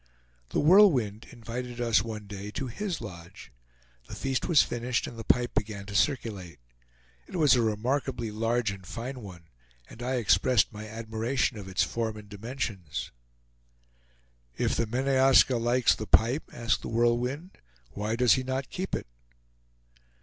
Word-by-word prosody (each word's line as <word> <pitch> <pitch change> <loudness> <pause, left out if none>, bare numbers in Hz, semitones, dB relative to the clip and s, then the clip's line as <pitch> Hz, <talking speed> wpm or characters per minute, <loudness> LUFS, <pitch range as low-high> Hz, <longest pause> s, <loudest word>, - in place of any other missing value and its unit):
The - - 0
Whirlwind 145 - +5
invited 120 +1 -7
us 115 -4 +3
one 110 -1 -6
day 100 0 -7
to 135 - -3
his 175 - -4
lodge. 90 -4 -10 0.6
The - - -8
feast 135 -1 -2
was 170 -5 +6
finished, 120 +1 -2
and - - -8
the 115 - -7
pipe 120 +2 +2
began 105 -2 -2
to 100 - -8
circulate. 105 - -1 0.7
It - - -9
was 155 -5 +5
a 125 - +4
remarkably 115 +2 -1
large 115 0 0
and 100 -1 -9
fine 120 +7 -6
one, 90 -5 -10 0.4
and 120 - -12
I 130 +2 -1
expressed 120 -1 +3
my 105 0 -7
admiration 115 +3 -2
of 95 - -9
its 95 - +1
form 110 -2 -2
and 105 -1 -11
dimensions. 105 - -5 1.5
"If - - +1
the 115 - 0
Meneaska 130 +1 +4
likes 120 +1 +3
the 110 - -6
pipe," 120 +9 +3
asked 115 -1 -1
The - - -6
Whirlwind, 120 +9 0 0.3
"why 105 +2 -2
does 125 0 +5
he 130 - +1
not 130 +1 -3
keep 185 +1 -3
it?" - - -5
115 Hz, 155 wpm, -28 LUFS, 105-130 Hz, 1.5 s, was